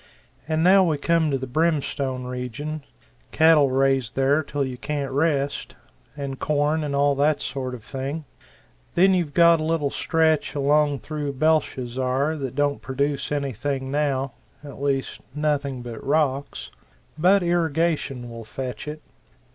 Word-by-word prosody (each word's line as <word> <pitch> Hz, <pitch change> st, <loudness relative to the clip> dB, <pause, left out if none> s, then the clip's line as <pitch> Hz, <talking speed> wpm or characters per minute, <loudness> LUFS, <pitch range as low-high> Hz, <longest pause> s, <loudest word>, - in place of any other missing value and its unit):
And 160 Hz, 0 st, +1 dB
now 190 Hz, +2 st, +6 dB
we 160 Hz, -4 st, +1 dB
come 165 Hz, +1 st, +2 dB
to 135 Hz, -, +1 dB
the 130 Hz, -, -5 dB
Brimstone 140 Hz, -3 st, -1 dB
region 125 Hz, +5 st, -5 dB, 0.5 s
cattle 155 Hz, -3 st, +5 dB
raised 135 Hz, -3 st, +1 dB
there 135 Hz, +3 st, +3 dB
till 140 Hz, -1 st, -2 dB
you 130 Hz, -1 st, -5 dB
can't 140 Hz, +1 st, -3 dB
rest 140 Hz, -1 st, 0 dB, 0.4 s
and 140 Hz, -2 st, -5 dB
corn, 150 Hz, +1 st, +1 dB
and 145 Hz, -1 st, -2 dB
all 140 Hz, 0 st, +3 dB
that 145 Hz, +1 st, +2 dB
sort 130 Hz, -2 st, -4 dB
of 115 Hz, -, -12 dB
thing. 140 Hz, +5 st, -5 dB, 0.7 s
Then 190 Hz, +2 st, +5 dB
you've 170 Hz, -6 st, -1 dB
got 170 Hz, -1 st, +6 dB
a -, -, -2 dB
little 155 Hz, -3 st, 0 dB
stretch 160 Hz, -3 st, +1 dB
along 145 Hz, -1 st, +2 dB
through 145 Hz, +1 st, -4 dB
Belshazzar 130 Hz, -1 st, 0 dB
that 135 Hz, -3 st, -5 dB
don't 145 Hz, 0 st, 0 dB
produce 140 Hz, +1 st, -2 dB
anything 135 Hz, -1 st, -2 dB
now 140 Hz, -2 st, 0 dB, 0.3 s
at 140 Hz, -2 st, -10 dB
least 135 Hz, -2 st, -1 dB
nothing 145 Hz, -4 st, -1 dB
but 120 Hz, -2 st, -8 dB
rocks 140 Hz, -, -1 dB, 0.4 s
but 180 Hz, +5 st, +4 dB
irrigation 165 Hz, -6 st, 0 dB
will 115 Hz, -1 st, -8 dB
fetch 130 Hz, +5 st, -6 dB
it. 150 Hz, 0 st, -6 dB
145 Hz, 145 wpm, -24 LUFS, 135-155 Hz, 0.7 s, now